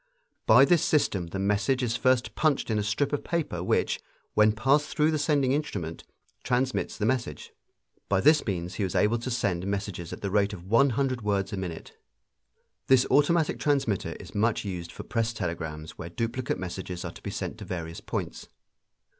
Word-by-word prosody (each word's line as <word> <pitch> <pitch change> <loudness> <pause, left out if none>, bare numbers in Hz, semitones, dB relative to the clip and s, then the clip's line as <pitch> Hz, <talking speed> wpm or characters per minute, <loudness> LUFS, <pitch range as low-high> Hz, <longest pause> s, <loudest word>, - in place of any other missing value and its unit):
By - - +8
this 175 -4 +3
system 100 - +1
the 90 - -5
message 105 +7 +1
is 115 -1 0
first 125 -3 +2
punched 150 -4 +1
in 105 - +1
a - - 0
strip 110 +8 0
of 145 - -1
paper 155 - -2
which, - - +1 0.3
when 105 0 +5
passed 135 +7 +2
through 155 +1 +4
the 155 - 0
sending 145 -3 +2
instrument, 100 - -3 0.4
transmits 125 +1 0
the 105 - -1
message. 115 - -2 0.6
By 100 - +3
this 150 +8 +5
means 90 -3 -2
he 105 - -2
was 95 - -2
able 115 +3 +3
to 120 - -4
send 100 -7 -1
messages 100 -4 -3
at - - -7
the 100 - -2
rate 100 0 +2
of 90 -2 -9
one 115 +8 +4
hundred 130 -3 0
words 100 -1 -1
a - - -2
minute. 90 -4 -6 0.9
This 130 -1 +5
automatic 155 +2 +3
transmitter 135 -9 0
is - - -11
much 110 +1 +1
used 90 -3 -5
for - - -8
press 115 0 -1
telegrams 80 -5 -5
where 85 - -6
duplicate 115 +6 -2
messages 90 -1 -5
are - - -4
to - - -13
be - - -5
sent - - -5
to - - -7
various 85 -2 -5
points. - - -5
110 Hz, 190 wpm, -27 LUFS, 95-130 Hz, 0.9 s, By